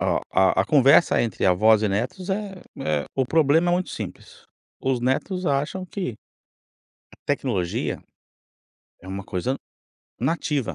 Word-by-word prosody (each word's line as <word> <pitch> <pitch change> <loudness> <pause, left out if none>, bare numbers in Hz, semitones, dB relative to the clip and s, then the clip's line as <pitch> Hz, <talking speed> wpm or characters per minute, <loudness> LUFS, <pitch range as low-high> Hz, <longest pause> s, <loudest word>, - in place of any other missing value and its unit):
a - - +1
a 95 0 +4
a - - -5
conversa 140 +2 +5
entre 115 -5 -2
avós 110 +4 +4
e 105 - +2
netos 125 - -3
é 195 -1 -3 0.2
é 75 - -1
o 135 - +1
problema 160 +4 +3
é - - +3
muito 180 +1 -2
simples. - - -8 0.4
Os 130 -2 0
netos 175 +9 -1
acham 145 +7 -1
que 180 - -4 1.0
a - - -18
tecnologia, 115 -11 -1 1.0
é 95 - -13
uma 95 +1 -5
coisa 100 +8 -2 0.7
nativa, 145 -1 -1
135 Hz, 140 wpm, -24 LUFS, 105-170 Hz, 1.0 s, conversa